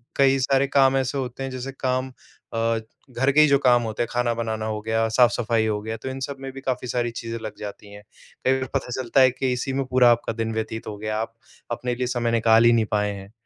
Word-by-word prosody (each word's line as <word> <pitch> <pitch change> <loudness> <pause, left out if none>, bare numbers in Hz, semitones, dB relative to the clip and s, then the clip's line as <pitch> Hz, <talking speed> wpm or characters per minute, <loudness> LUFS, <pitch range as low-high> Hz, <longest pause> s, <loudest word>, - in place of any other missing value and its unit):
कई 135 0 +4
सारे 135 +1 +2
काम 135 -1 +5
ऐसे 135 +1 -1
होते 130 0 -4
हैं, 135 - -3
जैसे 130 +1 -5
काम 130 0 -1 0.4
अ, - - -3 0.5
घर 130 +3 +1
के 155 - +6
ही 150 - +6
जो 140 -1 +5
काम 120 -3 +4
होते 110 +1 -2
हैं, - - -4
खाना 120 -1 +1
बनाना 110 -1 -3
हो 110 -1 -2
गया, 110 +1 0
साफ़-सफाई 115 -1 +2
हो 105 -1 -1
गया, 110 +1 -5
तो 130 +4 -6
इन 130 - -5
सब 140 -1 -7
में 135 0 -6
भी 135 - -9
काफ़ी 125 -1 -2
सारी 120 -1 -1
चीज़ें 115 0 -5
लग 110 -1 -6
जाती 105 0 -8
हैं। 105 0 -12 0.4
कई 130 - +4
बार 130 - -4
पता 135 - -1
चलता 130 +2 +2
है 130 -1 +6
कि 130 0 -2
इसी 130 +2 -3
में 135 0 -1
पूरा 125 -1 +5
आपका 115 - 0
दिन 115 0 -3
व्यतीत 110 0 -4
हो 105 - -6
गया, 110 +1 -3
आप 115 +1 -4 0.4
अपने 125 +1 -2
लिए 125 +1 -2
समय 120 -1 0
निकाल 115 0 +4
ही 120 - +7
नहीं 115 -1 +3
पाए 105 -1 +1
हैं। 100 +1 -11
120 Hz, 255 wpm, -24 LUFS, 110-130 Hz, 0.5 s, ही